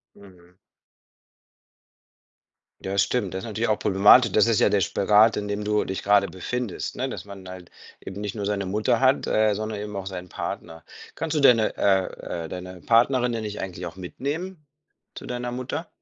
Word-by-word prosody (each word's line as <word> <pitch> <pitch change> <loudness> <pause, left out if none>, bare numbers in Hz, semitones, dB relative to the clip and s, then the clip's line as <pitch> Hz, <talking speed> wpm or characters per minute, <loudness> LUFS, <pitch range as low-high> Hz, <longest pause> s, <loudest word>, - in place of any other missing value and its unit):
Mhm. 90 -2 -18 2.3
Ja, 95 +1 -4
stimmt. 100 -2 +1
Das 95 - -3
ist - - -6
natürlich 110 +1 -2
auch 105 - +1
problematisch. 105 +4 +6
Das 110 +3 +4
ist 115 - +2
ja - - +4
der 100 -2 +2
Spagat, 105 +6 +4
in 105 0 -3
dem 105 0 -3
du 105 0 +1
dich 95 - -4
gerade 100 -1 +4
befindest, 120 +4 -4
ne, - - -2
dass - - -6
man 100 -2 -11
halt 90 -2 -10 0.3
eben 95 +1 -8
nicht 105 -1 -4
nur 100 -2 -3
seine 100 -1 -1
Mutter 105 +3 +1
hat, 135 +1 +3
äh, 110 -1 +3
sondern 110 0 -4
eben 105 -1 -6
auch 95 -1 -5
seinen 90 -2 -6
Partner. 80 -2 -6 0.3
Kannst 160 0 -3
du - - +2
denn, 125 -5 +6
äh 95 -3 +2 0.4
äh, - - -9
deine 90 -1 -8
Partnerin 120 +1 +3
denn 115 -1 -3
nicht 105 0 -5
eigentlich 90 -1 -6
auch 85 +1 -7
mitnehmen 150 - -5 0.5
zu - - -8
deiner 125 0 -4
Mutter? 130 +7 -4
105 Hz, 185 wpm, -24 LUFS, 95-115 Hz, 2.3 s, problematisch